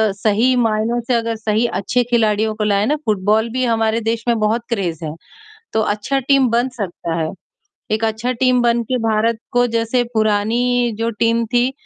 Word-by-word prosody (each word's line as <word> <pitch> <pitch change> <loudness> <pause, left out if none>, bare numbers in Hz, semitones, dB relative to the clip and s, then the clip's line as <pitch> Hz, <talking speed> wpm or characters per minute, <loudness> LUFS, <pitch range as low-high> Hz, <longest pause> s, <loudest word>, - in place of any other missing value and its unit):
सही 220 +5 +2
मायनों 225 0 +1
से 250 - +1
अगर 230 -1 0
सही 220 +1 0
अच्छे 240 +6 0
खिलाड़ियों 220 -2 +2
को 215 - -2
लाएँ 205 0 +2
ना 300 - +2
फुटबॉल 215 +2 +1
भी 255 +1 -1
हमारे 225 -1 +1
देश 225 +1 -2
में 235 -1 +2
बहुत 215 +3 +1
क्रेज़ 175 -8 -2
है। 150 - -4 0.6
तो 220 - +1
अच्छा 210 +7 -1
टीम 270 -1 +3
बन 240 +3 +1
सकता 175 -4 -4
है। 160 - -1 0.6
एक 220 +1 0
अच्छा 220 +3 -1
टीम 255 -1 +3
बन 235 0 +2
के 255 +3 -1
भारत 220 +1 +1
को 245 0 +3
जैसे 230 +2 +1
पुरानी 230 +3 +1
जो 230 0 0
टीम 230 0 +2
थी 245 +2 +3
230 Hz, 180 wpm, -18 LUFS, 215-240 Hz, 0.6 s, टीम